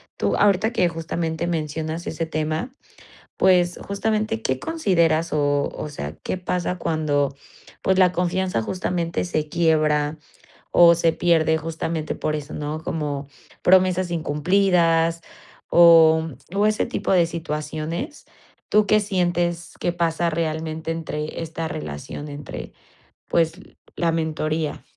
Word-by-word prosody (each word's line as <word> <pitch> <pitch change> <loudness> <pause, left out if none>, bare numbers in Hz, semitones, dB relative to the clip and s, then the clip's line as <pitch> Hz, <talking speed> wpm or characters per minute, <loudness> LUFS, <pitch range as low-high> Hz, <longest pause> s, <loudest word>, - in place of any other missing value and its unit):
Tú, - - 0
ahorita 205 +2 +3
que 185 -7 +2
justamente 165 0 -3
mencionas 160 0 -3
ese 165 +1 -2
tema, 155 - -3 0.6
pues, 180 -2 +3
justamente, 215 - -1
¿qué 130 +3 -1
consideras 170 - +1
o 145 -1 +1
o - - -5
sea, 75 - -6
qué - - -2
pasa 180 0 -2
cuando, 145 -4 0 0.5
pues 190 0 +2
la 180 -1 +5
confianza 180 -7 0
justamente 175 +2 -2
se 155 -3 -2
quiebra 155 -2 +2 0.6
o 170 -1 +7
se 165 -1 +2
pierde?, 160 -2 +2
justamente 160 0 -3
por 155 - -2
eso, 150 -1 -6
¿no? 150 +1 -4
Como 145 -4 -3 0.3
promesas 185 -1 +3
incumplidas, 165 +1 +2 0.5
o, 165 -2 +7 0.3
mm, 195 - -5
o 205 - +3
ese 215 - +1
tipo - - -2
de 175 -2 +5
situaciones, 160 - -5 0.4
¿tú 210 0 +4
qué 215 +1 +4
sientes 175 -4 -1
que 175 - -1
pasa 170 0 0
realmente 160 0 -3
entre 155 -1 -4
esta 165 0 -4
relación 75 - -6
entre, 145 0 -8 0.6
pues 165 +1 +1 0.3
la 170 -1 +1
mentoría? 155 -1 -2
165 Hz, 125 wpm, -23 LUFS, 155-175 Hz, 0.6 s, o